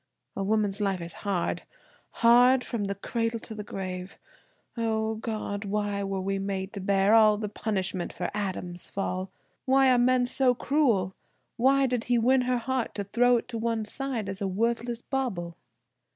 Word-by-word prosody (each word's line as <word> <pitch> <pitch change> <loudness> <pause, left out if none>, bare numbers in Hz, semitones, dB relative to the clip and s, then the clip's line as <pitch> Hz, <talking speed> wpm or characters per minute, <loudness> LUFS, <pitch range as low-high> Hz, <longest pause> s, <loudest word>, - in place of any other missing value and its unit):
A 195 - -2
woman's 210 0 0
life 195 -2 0
is 170 0 -6
hard, 195 -4 -1 0.6
hard, 245 +2 +6
from 230 -5 -3
the 200 0 -2
cradle 230 +3 -2
to - - -8
the 210 -1 -6
grave. 185 -1 -6 0.6
O, 220 -1 0
God! 215 -2 -4
why 205 0 -1
were 195 -1 -2
we 195 +1 -1
made 195 0 -3
to 200 - -5
bear 195 +1 +3
all 215 -2 +6
the 210 0 -3
punishment 195 -4 -2
for 180 - -4
Adam's 185 -3 -4
fall! 190 -1 -3 0.4
Why 265 0 +5
are 250 - +4
men 250 0 +3
so 250 0 +2
cruel? 235 -10 +1 0.4
Why 270 +3 +4
did 250 -3 -1
he 245 0 +2
win 255 +3 +4
her 250 - +2
heart 255 0 -2
to 205 - -2
throw 240 +5 +3
it 240 +1 -6
one 230 -1 -1
side 255 -3 -3
as 195 0 -5
a 200 - 0
worthless 235 +4 -1
bauble?" 195 -11 -3
215 Hz, 170 wpm, -27 LUFS, 195-245 Hz, 0.6 s, hard